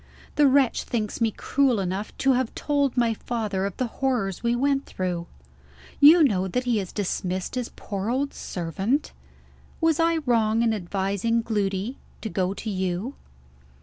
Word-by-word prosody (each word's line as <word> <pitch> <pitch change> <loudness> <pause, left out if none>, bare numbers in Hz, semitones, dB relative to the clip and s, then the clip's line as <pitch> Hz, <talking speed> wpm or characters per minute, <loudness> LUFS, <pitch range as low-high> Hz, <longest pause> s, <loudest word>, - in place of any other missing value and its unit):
The 295 -1 +5
wretch 270 -2 +3
thinks 220 -1 -3
me 230 - +4
cruel 255 +1 +1
enough 190 +2 -3
to 270 - +6
have 255 -2 -1
told 285 -3 0
my 235 -2 +3
father 210 -4 -2
of 200 - -8
the 255 - 0
horrors 235 -6 -1
we 235 0 +1
went 275 +2 +1
through! 175 -2 -3 0.7
You 310 +4 +8
know 190 -9 +2
that 250 +7 -1
he 240 -3 +1
has 190 -3 -5
dismissed 185 -2 -2
his 250 -2 -2
poor 200 0 -4
old 275 +3 -1
servant? 190 - -2 0.7
Was 325 -1 +2
I 330 0 +3
wrong 225 -2 +2
in 225 -1 +2
advising 200 +4 -1
Gloody 205 +2 -2 0.2
to 220 - -4
go 190 -1 -1
to 220 - -5
you?" 190 +6 -2
225 Hz, 160 wpm, -25 LUFS, 195-260 Hz, 0.7 s, You